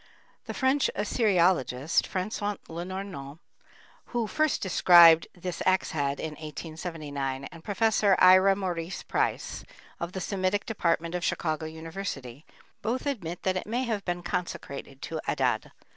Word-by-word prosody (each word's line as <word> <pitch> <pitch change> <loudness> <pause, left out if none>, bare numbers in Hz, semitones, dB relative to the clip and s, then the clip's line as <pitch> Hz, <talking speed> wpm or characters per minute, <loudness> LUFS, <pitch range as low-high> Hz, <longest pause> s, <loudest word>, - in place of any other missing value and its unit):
The - - -6
French 265 +1 +2
assyriologist, 180 - +2
François 205 +2 -2
Lenormant, 170 -4 -6 0.7
who 240 -2 -2
first 310 +6 +1
described 170 -3 +7
this 180 -1 -5
axe 185 0 +2
head 140 -2 -1
in 160 - -3
1879, 150 -3 -5
and 165 -1 -12
Prof. 215 +2 +1
Ira 185 +1 +7
Maurice 180 -2 -4
Price, - - -1 0.4
of 170 +1 -4
the 190 - -3
Semitic 190 +1 -1
Department 170 -5 0
of 180 -1 -2
Chicago 155 -1 -1
University, 160 -5 -7 0.3
both 245 +5 -2
admit 180 - -3
that 190 0 +1
it 185 - -5
may 240 +4 -1
have 220 -5 -2
been 175 -1 -3
consecrated 140 -6 -5
to 160 -1 -4
Adad. - - 0
180 Hz, 130 wpm, -28 LUFS, 160-200 Hz, 0.7 s, described